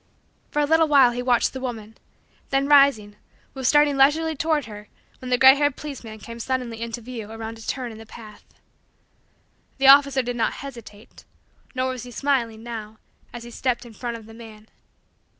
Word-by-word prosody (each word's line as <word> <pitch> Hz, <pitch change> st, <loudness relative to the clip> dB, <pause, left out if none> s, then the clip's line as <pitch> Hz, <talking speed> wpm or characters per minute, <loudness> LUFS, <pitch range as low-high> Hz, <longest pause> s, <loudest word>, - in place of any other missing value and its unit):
For 295 Hz, -, -2 dB
a 295 Hz, -, +3 dB
little 320 Hz, +2 st, +3 dB
while 275 Hz, -5 st, +5 dB
he 245 Hz, +1 st, -4 dB
watched 245 Hz, -2 st, +1 dB
the 260 Hz, -, -6 dB
woman, 225 Hz, -4 st, -6 dB, 0.5 s
then 275 Hz, 0 st, +1 dB
rising, 275 Hz, -8 st, +4 dB, 0.4 s
was 265 Hz, -2 st, -3 dB
starting 295 Hz, 0 st, +4 dB
leisurely 315 Hz, +4 st, +3 dB
toward 310 Hz, -1 st, 0 dB
her 210 Hz, -1 st, -11 dB, 0.3 s
when 255 Hz, -, -8 dB
the 250 Hz, -, +2 dB
gray 265 Hz, +1 st, +8 dB
haired 290 Hz, -1 st, 0 dB
policeman 250 Hz, -7 st, -8 dB
came 230 Hz, +2 st, -10 dB
suddenly 240 Hz, -2 st, -3 dB
into 235 Hz, +1 st, -5 dB
view 230 Hz, -3 st, -8 dB
around 225 Hz, 0 st, -7 dB
a -, -, -12 dB
turn 245 Hz, +1 st, -4 dB
in 220 Hz, -, -11 dB
the 225 Hz, -, -13 dB
path. 215 Hz, -2 st, -13 dB, 1.3 s
The 270 Hz, -, 0 dB
officer 275 Hz, -1 st, +6 dB
did 245 Hz, 0 st, -4 dB
not 230 Hz, -, 0 dB
hesitate; 235 Hz, -6 st, -12 dB, 0.5 s
nor 255 Hz, 0 st, -1 dB
was 255 Hz, -2 st, -6 dB
he 250 Hz, -, -10 dB
smiling, 240 Hz, -4 st, -1 dB
now, 220 Hz, -2 st, -8 dB, 0.3 s
as 240 Hz, -, -9 dB
he 240 Hz, -, -11 dB
stepped 250 Hz, 0 st, -2 dB
in 235 Hz, -, -13 dB
front 235 Hz, +1 st, -5 dB
of 225 Hz, -, -14 dB
the 225 Hz, -, -14 dB
man. 220 Hz, -2 st, -13 dB
245 Hz, 185 wpm, -23 LUFS, 225-275 Hz, 1.3 s, gray